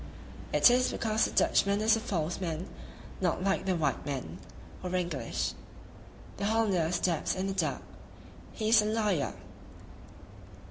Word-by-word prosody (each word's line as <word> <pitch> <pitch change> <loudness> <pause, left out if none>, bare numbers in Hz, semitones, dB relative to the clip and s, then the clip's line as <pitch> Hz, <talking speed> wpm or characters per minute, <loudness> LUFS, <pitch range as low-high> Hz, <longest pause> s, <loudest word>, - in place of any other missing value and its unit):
It - - +6
is 250 +1 +3
because 220 -1 +1
the - - -3
Dutchman 200 +1 +2
is 220 +1 +4
a - - -1
false 175 -6 -2
man, 170 +1 -3 0.5
not 180 0 0
like 195 0 0
the 185 - +2
white 160 -3 -1
man 140 -3 -5 0.4
[English]. 175 -9 -2 0.8
The 200 - -2
Hollander 200 -7 +1
stabs 175 -3 0
in 185 +1 -2
the 195 - -2
dark; 190 - -1 0.7
he 215 -1 -2
is 225 -1 +7
a - - -2
liar!" 210 - 0
190 Hz, 140 wpm, -30 LUFS, 170-215 Hz, 0.8 s, is